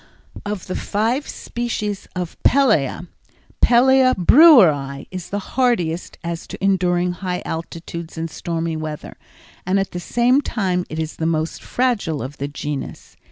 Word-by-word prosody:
Of 205 Hz, -3 st, -4 dB
the 185 Hz, -, -5 dB
five 230 Hz, +7 st, -1 dB
species 215 Hz, -4 st, -4 dB
of 180 Hz, -2 st, -4 dB
pellæa, 215 Hz, -, +2 dB, 0.5 s
P. -, -, +6 dB, 0.5 s
Breweri 175 Hz, -, +6 dB
is 185 Hz, -2 st, -7 dB
the 200 Hz, -, -2 dB, 0.2 s
hardiest 185 Hz, -10 st, 0 dB
as 170 Hz, 0 st, -5 dB
to -, -, -7 dB
enduring 180 Hz, -2 st, +1 dB
high 180 Hz, 0 st, -4 dB
altitudes 165 Hz, 0 st, -6 dB
and 165 Hz, 0 st, -2 dB
stormy 165 Hz, 0 st, -3 dB
weather 155 Hz, -1 st, -6 dB, 0.5 s
and 190 Hz, +2 st, +1 dB
at 195 Hz, -, -2 dB
the 175 Hz, -, -4 dB
same 240 Hz, +8 st, +2 dB
time 185 Hz, -9 st, -1 dB
it 155 Hz, -, -6 dB
is 160 Hz, -1 st, -4 dB
the 160 Hz, -, -1 dB
most 160 Hz, 0 st, -2 dB
fragile 215 Hz, -, -1 dB
of 135 Hz, +3 st, -8 dB
the 140 Hz, -, -2 dB
genus. 145 Hz, -1 st, -6 dB
180 Hz, 145 wpm, -20 LUFS, 160-210 Hz, 0.5 s, P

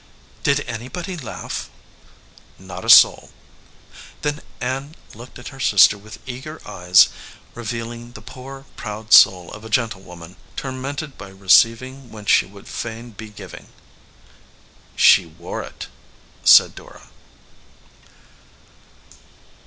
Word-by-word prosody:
"Did 140 Hz, +1 st, +1 dB
anybody 130 Hz, -, -6 dB
laugh?" 145 Hz, -9 st, -7 dB, 0.9 s
"Not 95 Hz, -2 st, -10 dB
a -, -, -4 dB
soul." -, -, +7 dB, 0.9 s
Then 150 Hz, 0 st, -2 dB, 0.2 s
Ann 135 Hz, +5 st, -4 dB, 0.2 s
looked 120 Hz, +3 st, -12 dB
at 125 Hz, -, -9 dB
her 135 Hz, -, -14 dB
sister 105 Hz, -4 st, +5 dB
with 105 Hz, +2 st, -12 dB
eager 130 Hz, +5 st, -8 dB
eyes, 90 Hz, +2 st, +4 dB, 0.4 s
revealing 120 Hz, +1 st, -6 dB
the -, -, -11 dB
poor, 135 Hz, +1 st, -11 dB
proud 105 Hz, -1 st, -4 dB
soul 90 Hz, -2 st, +6 dB
of 105 Hz, -, -11 dB
a 110 Hz, -, -9 dB
gentlewoman 95 Hz, -7 st, -4 dB, 0.2 s
tormented 135 Hz, +2 st, -6 dB
by 100 Hz, -, -9 dB
receiving 115 Hz, +7 st, +2 dB
when 105 Hz, -2 st, -11 dB
she -, -, +3 dB
would 100 Hz, 0 st, -15 dB
fain 115 Hz, +1 st, -7 dB
be 110 Hz, +1 st, -10 dB
giv 105 Hz, -, -12 dB
ing. -, -, -12 dB, 1.3 s
"She 95 Hz, -3 st, +5 dB
wore 80 Hz, -, -7 dB
it," -, -, -9 dB, 0.6 s
said -, -, +7 dB
Dora. -, -, -15 dB
115 Hz, 115 wpm, -20 LUFS, 105-130 Hz, 1.3 s, soul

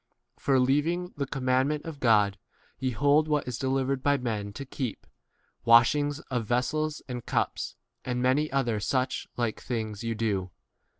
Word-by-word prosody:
For, 135 Hz, -2 st, +3 dB
leaving 160 Hz, +8 st, +1 dB
the 140 Hz, -1 st, -2 dB
com 135 Hz, -1 st, -5 dB
mandment 130 Hz, +4 st, +1 dB
of 160 Hz, -4 st, -7 dB
God, 105 Hz, -5 st, +3 dB, 0.4 s
ye 130 Hz, -, 0 dB
hold 145 Hz, +5 st, +3 dB
what 150 Hz, -3 st, 0 dB
is 125 Hz, -1 st, -4 dB
delivered 135 Hz, 0 st, 0 dB
by 145 Hz, +1 st, +3 dB
men 110 Hz, -5 st, -3 dB
[to 140 Hz, -, -6 dB
keep] 130 Hz, -3 st, -5 dB, 0.3 s
— -, -, -43 dB
washings 140 Hz, +6 st, +5 dB
of 120 Hz, -4 st, -3 dB
vessels 155 Hz, +6 st, 0 dB
and 125 Hz, -2 st, -5 dB
cups, -, -, -1 dB, 0.3 s
and 125 Hz, -1 st, -2 dB
many 130 Hz, +5 st, +2 dB
other 120 Hz, -6 st, +1 dB
such 130 Hz, +5 st, -1 dB
like 120 Hz, -3 st, -1 dB
things 110 Hz, -3 st, -4 dB
ye 115 Hz, 0 st, -2 dB
do. 100 Hz, -4 st, -1 dB
130 Hz, 165 wpm, -28 LUFS, 115-145 Hz, 0.4 s, washings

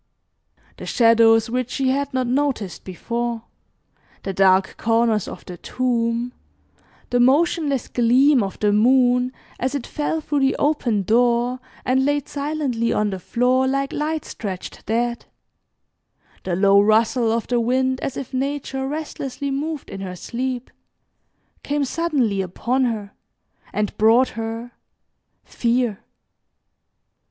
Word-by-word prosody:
The -, -, -8 dB
shadows 230 Hz, -1 st, +5 dB
which 250 Hz, +1 st, -2 dB
she 265 Hz, -1 st, 0 dB
had 280 Hz, +2 st, 0 dB
not 255 Hz, -1 st, 0 dB
noticed 245 Hz, -, -1 dB
before, 235 Hz, +5 st, -4 dB, 0.8 s
the 195 Hz, -, -3 dB
dark 190 Hz, 0 st, +3 dB
corners 225 Hz, -2 st, +1 dB
of -, -, -9 dB
the 180 Hz, -, -8 dB
tomb, 240 Hz, +1 st, -1 dB, 0.8 s
the 245 Hz, -, +2 dB
motionless 280 Hz, +1 st, +2 dB
gleam 255 Hz, +3 st, +4 dB
of 195 Hz, -2 st, -4 dB
the 210 Hz, -1 st, +2 dB
moon 250 Hz, +2 st, +3 dB, 0.3 s
as 260 Hz, +3 st, -1 dB
it 275 Hz, -, -3 dB
fell 305 Hz, +1 st, -2 dB
through 295 Hz, -2 st, -1 dB
the 270 Hz, 0 st, +2 dB
open 245 Hz, -9 st, +1 dB
door, 240 Hz, +3 st, +2 dB, 0.3 s
and 260 Hz, +1 st, +2 dB
laid 290 Hz, 0 st, 0 dB
silently 280 Hz, -5 st, -2 dB
on 210 Hz, -1 st, +1 dB
the 190 Hz, -, -4 dB
floor 250 Hz, +7 st, +1 dB
like 275 Hz, +1 st, -1 dB
light 310 Hz, +1 st, -2 dB
stretched 190 Hz, -5 st, -7 dB
dead, 235 Hz, +2 st, -1 dB, 1.2 s
the 180 Hz, -, -1 dB
low 200 Hz, +2 st, +5 dB
rustle 225 Hz, +2 st, +3 dB
of 230 Hz, 0 st, -1 dB
the 245 Hz, -1 st, 0 dB
wind 260 Hz, +2 st, +1 dB
as 270 Hz, -, -3 dB
if 270 Hz, -, -6 dB
Nature 270 Hz, 0 st, -2 dB
restlessly 280 Hz, -2 st, -4 dB
moved 295 Hz, +2 st, -3 dB
in 195 Hz, -, -7 dB
her 185 Hz, -2 st, -5 dB
sleep, 250 Hz, +5 st, -4 dB, 0.9 s
came 290 Hz, 0 st, -1 dB
suddenly 265 Hz, -10 st, 0 dB
upon 240 Hz, +8 st, -1 dB
her, 215 Hz, -4 st, -3 dB, 0.6 s
and 210 Hz, -1 st, -2 dB
brought 230 Hz, +4 st, +5 dB
her 225 Hz, +2 st, -5 dB, 0.7 s
fear. 235 Hz, -3 st, 0 dB
245 Hz, 130 wpm, -22 LUFS, 225-270 Hz, 1.2 s, shadows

